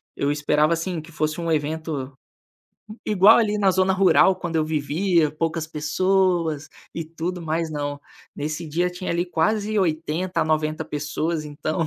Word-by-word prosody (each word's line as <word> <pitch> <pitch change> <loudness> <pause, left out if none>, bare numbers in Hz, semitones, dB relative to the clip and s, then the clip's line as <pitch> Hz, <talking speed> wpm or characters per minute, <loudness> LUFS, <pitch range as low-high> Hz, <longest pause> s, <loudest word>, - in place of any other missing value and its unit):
Eu 140 - 0
esperava, 150 +2 +2
assim, 170 +1 -2
que 160 +2 -14
fosse 155 +1 -2
um 170 -1 -2
evento 150 -2 -2 0.9
igual 210 +1 +6
ali 210 -2 +1
na 195 -2 +4
zona 190 +1 +2
rural 190 0 +5
quando 175 -3 -4
eu 155 - +2
vivia. 155 +2 +1
Poucas 165 +1 -2
pessoas 165 0 0 0.3
e 165 - -3
tudo 165 +3 -5
mais, 165 0 -2
não, 145 -1 -3 0.4
nesse 155 +3 -4
dia, 175 +4 0
tinha 180 +1 -5
ali 170 +1 0
quase 210 +5 0
80, 170 +1 -1
a - - -1
90 155 0 0
pessoas, 155 +2 -3
então 155 +3 -2
165 Hz, 155 wpm, -23 LUFS, 155-180 Hz, 0.9 s, igual